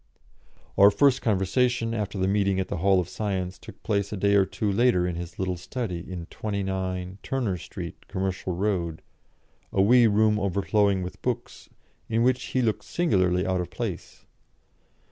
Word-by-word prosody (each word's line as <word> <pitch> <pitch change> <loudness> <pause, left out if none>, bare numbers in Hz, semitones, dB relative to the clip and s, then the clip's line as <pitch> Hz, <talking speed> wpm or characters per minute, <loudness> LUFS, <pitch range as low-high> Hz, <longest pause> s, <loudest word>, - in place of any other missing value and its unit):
Our 100 +1 +9
first 135 +4 +3
conversation, 115 +3 +1
after 105 -2 -3
the 95 0 +1
meeting 100 -1 +1
at 95 - -2
the 100 - -2
Hall 95 +2 +3
of 90 - -2
Science, 95 -4 -3
took - - -13
place 100 -1 0
a 105 - -3
day 100 +2 +2
or 100 -1 +5
two 100 +2 -2
later 100 -4 +3
in 90 - -3
his 85 -1 -7
little 95 -1 -2
study 90 -1 -4
in 85 -1 -7
29, 95 -2 -3
Turner 125 -8 -1
Street, 85 - -8
Commercial 95 -1 -3
Road, 90 -4 -1 0.7
a - - -1
wee 120 +4 +6
room 105 0 +3
overflowing 100 0 +1
with 90 - -8
books, - - -4 0.4
in 115 +1 +2
which 125 0 +2
he 130 - 0
looked 110 -2 0
singularly 95 - +1
out 95 -1 0
of 90 - -5
place. - - -6
100 Hz, 165 wpm, -26 LUFS, 90-110 Hz, 0.7 s, Our